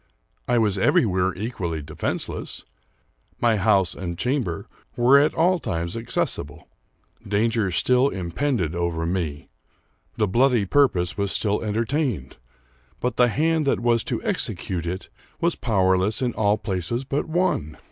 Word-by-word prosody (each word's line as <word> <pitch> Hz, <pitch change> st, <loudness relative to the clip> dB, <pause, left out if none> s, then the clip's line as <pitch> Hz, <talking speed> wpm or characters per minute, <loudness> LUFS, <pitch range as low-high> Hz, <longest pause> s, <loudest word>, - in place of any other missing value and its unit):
I 120 Hz, -, +2 dB
was 105 Hz, -4 st, +2 dB
everywhere 95 Hz, -2 st, +2 dB
equally 90 Hz, -7 st, -4 dB
defenseless. 80 Hz, +2 st, -4 dB, 0.7 s
My 115 Hz, -2 st, +3 dB
house 100 Hz, -3 st, +3 dB
and 85 Hz, -2 st, -5 dB
chamber 125 Hz, -, -1 dB, 0.3 s
were 125 Hz, +3 st, +6 dB
at 150 Hz, +2 st, +2 dB
all 175 Hz, +2 st, +3 dB
times 85 Hz, -, -3 dB
accessible. 80 Hz, -8 st, -2 dB, 0.6 s
Danger 110 Hz, 0 st, +1 dB
still 125 Hz, +8 st, +3 dB
impended 95 Hz, -, -2 dB
over 85 Hz, -1 st, -1 dB
me; 85 Hz, -4 st, -3 dB, 0.7 s
the 105 Hz, -, +2 dB
bloody 120 Hz, +1 st, +3 dB
purpose 95 Hz, -8 st, +2 dB
was 100 Hz, -1 st, 0 dB
still 105 Hz, 0 st, 0 dB
enter 110 Hz, +2 st, -1 dB
tained, 125 Hz, -, -2 dB, 0.6 s
but 125 Hz, -1 st, -2 dB
the 125 Hz, -, +5 dB
hand 155 Hz, +4 st, +1 dB
that -, -, +2 dB
was 120 Hz, -1 st, +2 dB
to -, -, -2 dB
execute 85 Hz, -3 st, -2 dB
it 90 Hz, +2 st, -4 dB, 0.3 s
was 170 Hz, 0 st, +2 dB
powerless 95 Hz, -2 st, +1 dB
in 120 Hz, -2 st, 0 dB
all 105 Hz, 0 st, +2 dB
places 100 Hz, +6 st, -3 dB
but 140 Hz, +2 st, -2 dB
one 165 Hz, -, 0 dB
105 Hz, 135 wpm, -23 LUFS, 90-125 Hz, 0.7 s, were